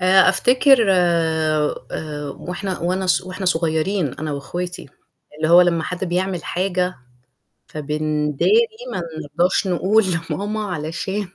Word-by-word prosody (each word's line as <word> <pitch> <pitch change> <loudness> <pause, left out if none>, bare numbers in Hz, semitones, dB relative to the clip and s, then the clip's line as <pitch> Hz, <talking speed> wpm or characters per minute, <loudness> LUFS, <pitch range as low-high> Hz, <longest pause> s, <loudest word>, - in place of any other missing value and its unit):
آآ، 185 +1 +5
أفتكر 250 +3 +4
آآ 160 -3 0
وإحنا 180 +2 -4
وأنا 185 +2 -1
ص 180 - +2
وإحنا 185 +1 -6
صغيرين 165 -1 0
أنا 155 0 -4
وأخواتي، 175 +6 -5 0.5
اللي 155 0 -1
هو 175 +2 +8
لمّا 175 -2 +2
حد 180 +3 -3
بيعمل 180 0 -2
حاجة 180 0 -1 0.7
فبنداري، 150 - +1 0.3
ما - - -2 0.2
نرضاش 170 +6 0
نقول 190 +5 +2 0.3
لماما 210 +2 -3
علشان 180 +5 -3
180 Hz, 115 wpm, -20 LUFS, 155-190 Hz, 0.7 s, هو